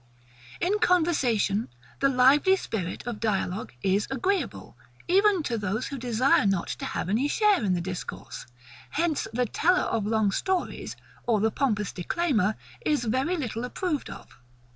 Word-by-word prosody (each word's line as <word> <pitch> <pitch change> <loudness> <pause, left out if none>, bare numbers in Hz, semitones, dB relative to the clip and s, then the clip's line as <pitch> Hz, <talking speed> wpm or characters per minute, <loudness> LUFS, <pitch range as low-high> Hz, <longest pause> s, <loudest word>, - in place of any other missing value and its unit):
In 395 +5 +1
conversation, 255 - +2 0.3
the 275 - +3
lively 275 +8 +5
spirit 200 - -4
of 240 -3 -4
dialogue 205 -2 -1
is 195 +2 +1
AGREEABLE, 370 +10 -2 0.3
even 390 -1 +4
to 235 -5 -2
those 210 +4 -2
who 275 - -5
desire 245 -2 +3
not 195 -3 0
to - - -4
have - - -3
any 225 +9 +1
share 415 - +3
in 190 -3 +2
the 175 - -1
discourse: 180 0 -6 0.4
hence 315 0 0
the 245 +2 0
teller 365 - +2
of 210 -2 -1
long 220 -2 +2
stories, 375 - -2 0.3
or 225 -3 +3
the 220 +2 +2
pompous 210 -6 0
declaimer, 220 - 0 0.3
is 295 -5 +1
very 260 +10 0
little 240 -6 -3
approved 300 +4 -2
of. - - -12
245 Hz, 150 wpm, -27 LUFS, 210-330 Hz, 0.4 s, lively